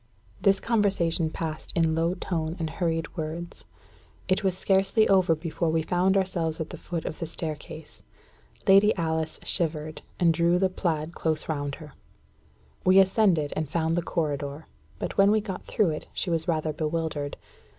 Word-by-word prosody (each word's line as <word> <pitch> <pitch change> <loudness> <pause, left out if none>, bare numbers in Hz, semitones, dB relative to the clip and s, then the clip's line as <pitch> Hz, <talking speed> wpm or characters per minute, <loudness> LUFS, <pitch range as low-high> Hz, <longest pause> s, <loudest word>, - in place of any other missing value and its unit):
This 195 -1 +4
conversation 190 -7 +1
passed 155 -1 -5
in 165 -1 +3
low 165 +2 +1
tone 165 -3 -2
and 160 -2 -3
hurried 165 -2 -2
words. 165 +1 -5 0.6
It 185 +2 +1
was 190 -2 +1
scarcely 195 +3 +3
over 185 -4 +4
before 165 +1 -2
we 160 0 +1
found 185 +3 +2
ourselves 170 -4 -1
at 160 - -4
the - - -7
foot 170 -2 -4
of 155 - -5
the 165 - -3
staircase. 155 -1 -7 0.7
Lady 200 +2 +6
Alice 160 -2 -2
shivered, 155 -3 -2 0.2
and 170 -2 +4
drew 170 +2 +3
the 190 +1 +2
plaid 165 -3 -2
close 160 -2 -2
round 145 -3 -2
her. 155 -3 -12 0.9
We 185 +1 +5
ascended, 190 -6 +3
and 155 -1 -1
soon - - -23
found 165 -1 +1
the 175 - +1
corridor; 145 -3 -3 0.3
but - - -4
when 195 0 +7
we 215 +1 +4
got 200 -3 -6
through 205 -7 +2
it, 155 - -5
she 180 - -1
was 165 +1 0
rather 155 -2 0
bewildered. 155 -2 -2
165 Hz, 170 wpm, -27 LUFS, 155-185 Hz, 0.9 s, when